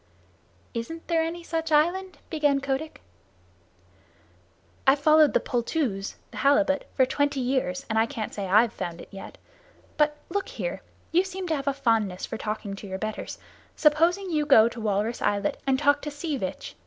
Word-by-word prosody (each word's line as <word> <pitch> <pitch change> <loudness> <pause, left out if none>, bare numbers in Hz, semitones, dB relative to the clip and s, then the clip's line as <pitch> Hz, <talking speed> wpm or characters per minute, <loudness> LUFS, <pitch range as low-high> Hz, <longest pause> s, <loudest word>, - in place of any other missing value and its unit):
"Isn't 325 +9 -5
there 330 -1 +2
any 335 +1 -3
such 325 -1 -3
island?" 350 +5 +2
began 295 -3 +2
Kotick. 275 +3 -3 1.8
"I've 270 +2 +6
followed 305 +1 +5
the - - +6
poltoos 240 -5 -2 0.2
[the 220 - -10
halibut] 285 +3 +3
for 260 - +5
twenty 285 +1 0
years, 250 -8 -1
and 220 0 +1
I 225 - +3
can't 230 -4 -5
say 200 -2 -4
I've 215 +4 +4
found 175 -2 -5
it - - -11
yet. 195 - -10 0.6
But 300 0 +2
look 400 +2 -2
here - - -4 0.3
you 355 +3 +4
seem 380 0 -5
to 320 - +2
have 275 -1 -5
a 280 - +3
fondness 220 -8 +1
for 225 - -6
talking 210 -2 -4
to 200 - -9
your 190 0 -4
betters 215 +2 -5 0.4
suppose 320 +4 +4
you 350 -6 -1
go 225 -6 +7
to 235 0 -8
Walrus 215 +2 -1
Islet 200 0 0
and 265 -1 +3
talk 285 +1 +3
to 295 - -4
Sea 295 +1 -3
Vitch. 190 -8 -5
275 Hz, 175 wpm, -26 LUFS, 220-315 Hz, 1.8 s, go